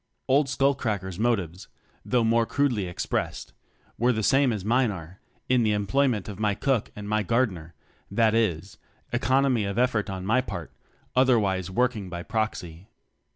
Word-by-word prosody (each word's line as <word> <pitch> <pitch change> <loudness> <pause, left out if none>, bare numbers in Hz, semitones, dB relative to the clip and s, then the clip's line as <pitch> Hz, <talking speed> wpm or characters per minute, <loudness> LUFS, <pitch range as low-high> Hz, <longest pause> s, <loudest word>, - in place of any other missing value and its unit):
Old 135 +1 +3
Skull 140 +1 +2
cracker's 100 -8 -3
motives 100 -7 -1 0.4
(though 125 -2 +1
more 115 0 +2
crudely 125 -9 0
expressed) 90 - -3 0.5
were 120 +2 +3
the 110 -2 -1
same 135 +2 +4
as 105 -4 -4
mine 125 +2 +3
are, 90 -1 -8 0.3
in 125 -1 +3
the 110 -2 +2
employment 110 +2 +1
of 105 -2 -7
my 105 -2 +1
cook 135 -3 0
and 105 0 -7
my 110 +1 +1
gardener, 95 -7 -1 0.3
that 110 +2 +2
is 100 -3 -1 0.3
economy 130 -1 +2
of 100 +1 -3
effort 120 -4 +1
on 95 -1 -5
my 115 +6 +3
part; 90 -10 -7 0.4
other 130 -1 +5
wise 95 -4 -1
working 110 -1 0
by 85 -1 -6
proxy. 100 -5 -3
110 Hz, 160 wpm, -26 LUFS, 95-125 Hz, 0.5 s, other